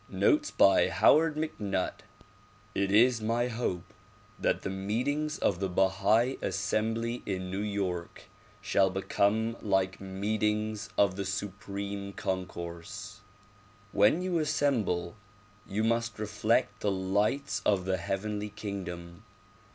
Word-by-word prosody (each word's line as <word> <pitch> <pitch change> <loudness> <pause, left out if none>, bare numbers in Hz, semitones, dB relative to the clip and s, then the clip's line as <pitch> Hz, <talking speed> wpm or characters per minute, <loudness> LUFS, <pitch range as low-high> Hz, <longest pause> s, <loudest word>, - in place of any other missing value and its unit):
Notes 305 0 +2
by - - +5
Howard 160 0 +4
MacNutt 105 -12 -2 0.7
IT 100 0 0
is 115 +2 +5
my 115 +3 0
hope 110 -7 -3 0.5
that - - 0
the 95 - -2
meetings 125 +11 -1
of 90 -4 +1
the 95 -1 -1
Bahai 100 +7 +2
Assembly 115 +4 -1
in 95 -2 -3
New 95 +2 -2
York 95 -5 -3 0.4
shall 95 -1 +3
become 100 +4 +1
like 95 -2 0
meetings 105 +2 -1
of 100 -2 +3
the 100 - -1
Supreme 100 +1 -4
Concourse. 95 +3 -5 0.7
When 105 - +4
you 180 -2 0
assemble 130 - 0 0.5
you 105 +3 -1
must 115 -1 0
reflect 105 +1 0
the 105 - 0
lights 100 +8 0
of 95 -3 +2
the 95 0 +1
heavenly 105 +3 -3
kingdom. 90 -4 -6
105 Hz, 115 wpm, -30 LUFS, 95-115 Hz, 0.7 s, by